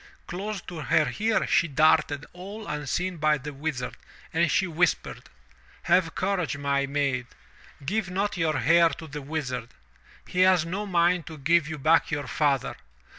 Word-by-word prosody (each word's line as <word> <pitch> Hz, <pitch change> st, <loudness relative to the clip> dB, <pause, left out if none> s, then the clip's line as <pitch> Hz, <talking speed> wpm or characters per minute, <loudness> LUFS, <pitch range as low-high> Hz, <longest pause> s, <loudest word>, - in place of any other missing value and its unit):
Close 200 Hz, +2 st, -5 dB
to 175 Hz, -, -9 dB
her 150 Hz, +2 st, +1 dB
ear 220 Hz, +1 st, +2 dB
she 170 Hz, -, +3 dB
darted, 150 Hz, 0 st, +3 dB
all 200 Hz, +5 st, -8 dB
unseen 150 Hz, +5 st, -2 dB
by 155 Hz, 0 st, +2 dB
the 145 Hz, +2 st, -7 dB
Wizard, 135 Hz, -3 st, -4 dB, 0.4 s
and 165 Hz, 0 st, +2 dB
she 190 Hz, -, +2 dB
whispered: 175 Hz, 0 st, -1 dB, 0.5 s
Have 170 Hz, -3 st, +2 dB
courage, 180 Hz, -7 st, -1 dB
my 140 Hz, -1 st, 0 dB
maid. 135 Hz, -3 st, -1 dB, 0.6 s
Give 195 Hz, +3 st, -1 dB
not 195 Hz, +3 st, -1 dB
your 160 Hz, -4 st, 0 dB
hair 170 Hz, +3 st, +5 dB
to 160 Hz, -, -8 dB
the 150 Hz, -1 st, -7 dB
Wizard. 130 Hz, -5 st, -4 dB, 0.6 s
He 180 Hz, -, -4 dB
has 185 Hz, -2 st, +5 dB
no 200 Hz, +5 st, -4 dB
mind 175 Hz, -2 st, +2 dB
to 160 Hz, -, -8 dB
give 160 Hz, +2 st, +2 dB
you 160 Hz, 0 st, -5 dB
back 155 Hz, +4 st, +3 dB
your 145 Hz, -2 st, -2 dB
father. 140 Hz, -3 st, 0 dB
160 Hz, 160 wpm, -26 LUFS, 145-180 Hz, 0.6 s, hair